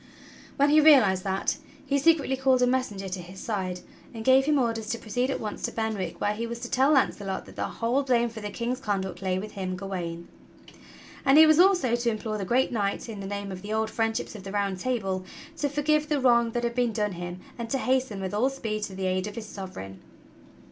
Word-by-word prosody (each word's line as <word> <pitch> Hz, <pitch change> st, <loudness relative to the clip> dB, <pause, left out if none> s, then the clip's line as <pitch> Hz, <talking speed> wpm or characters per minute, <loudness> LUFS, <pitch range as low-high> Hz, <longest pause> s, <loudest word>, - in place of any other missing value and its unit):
\\ -, -, -21 dB
hen 285 Hz, +1 st, +4 dB
he 305 Hz, +1 st, +7 dB
realized 230 Hz, -12 st, +6 dB
that, 195 Hz, 0 st, -1 dB, 0.3 s
he 280 Hz, 0 st, +1 dB
secretly 295 Hz, -3 st, +3 dB
called 260 Hz, -1 st, +3 dB
a -, -, +6 dB
messenger 245 Hz, -6 st, -1 dB
to 185 Hz, 0 st, -4 dB
his 185 Hz, +2 st, -11 dB
side 185 Hz, -5 st, -3 dB, 0.3 s
and 225 Hz, 0 st, -6 dB
gave 265 Hz, +1 st, +6 dB
him 300 Hz, 0 st, +3 dB
orders 225 Hz, -4 st, -1 dB
to 230 Hz, -, -1 dB
proceed 245 Hz, +4 st, -2 dB
at 270 Hz, -, -1 dB
once 210 Hz, -1 st, -5 dB
to -, -, -2 dB
Benwick 215 Hz, -6 st, -3 dB
where 205 Hz, -, +1 dB
he 230 Hz, +2 st, -4 dB
was 235 Hz, 0 st, -5 dB
to 240 Hz, -, -6 dB
tell 270 Hz, +4 st, +4 dB
Launcelot 200 Hz, -8 st, 0 dB
that -, -, -14 dB
the -, -, -2 dB
whole 240 Hz, +4 st, 0 dB
blame 245 Hz, -3 st, +2 dB
for 225 Hz, -1 st, -8 dB
the 210 Hz, -, -4 dB
King's 240 Hz, +4 st, -3 dB
conduct 195 Hz, -7 st, -3 dB
lay 185 Hz, -1 st, 0 dB
with 210 Hz, +3 st, -5 dB
him, 185 Hz, -2 st, -4 dB
Gawain. 175 Hz, -3 st, -5 dB, 1.0 s
And 275 Hz, +1 st, +5 dB
he 315 Hz, -, +10 dB
was 310 Hz, +1 st, +5 dB
also 355 Hz, -10 st, +4 dB
to 240 Hz, 0 st, 0 dB
implore 215 Hz, -1 st, -3 dB
the 195 Hz, -, -3 dB
great 250 Hz, +7 st, +2 dB
knight, 205 Hz, -2 st, -1 dB
in 215 Hz, -3 st, -6 dB
the 195 Hz, -, -5 dB
name 200 Hz, 0 st, -4 dB
of 185 Hz, -1 st, -7 dB
the 210 Hz, +2 st, -5 dB
old 220 Hz, 0 st, 0 dB
friendships 225 Hz, -1 st, -1 dB
of 210 Hz, -, -9 dB
the 195 Hz, -, -7 dB
Round 200 Hz, -2 st, -1 dB
Table, 195 Hz, -6 st, -1 dB, 0.3 s
to 290 Hz, -, 0 dB
forgive 300 Hz, +1 st, +1 dB
the 295 Hz, -2 st, +1 dB
wrong 235 Hz, -2 st, +4 dB
that 240 Hz, -, -1 dB
had 235 Hz, 0 st, 0 dB
been 240 Hz, -2 st, +1 dB
done 210 Hz, -1 st, 0 dB
him 175 Hz, 0 st, -6 dB, 0.2 s
and 230 Hz, -1 st, -4 dB
to 270 Hz, -, 0 dB
hasten 255 Hz, -6 st, 0 dB
with 190 Hz, 0 st, -4 dB
all 235 Hz, +6 st, +2 dB
speed 225 Hz, -6 st, -4 dB
to 190 Hz, -, -9 dB
the 190 Hz, 0 st, -3 dB
aid 185 Hz, +1 st, 0 dB
of 210 Hz, -, -7 dB
his 230 Hz, -, -6 dB
Sovereign. 185 Hz, -, -8 dB
220 Hz, 240 wpm, -27 LUFS, 195-260 Hz, 1.0 s, he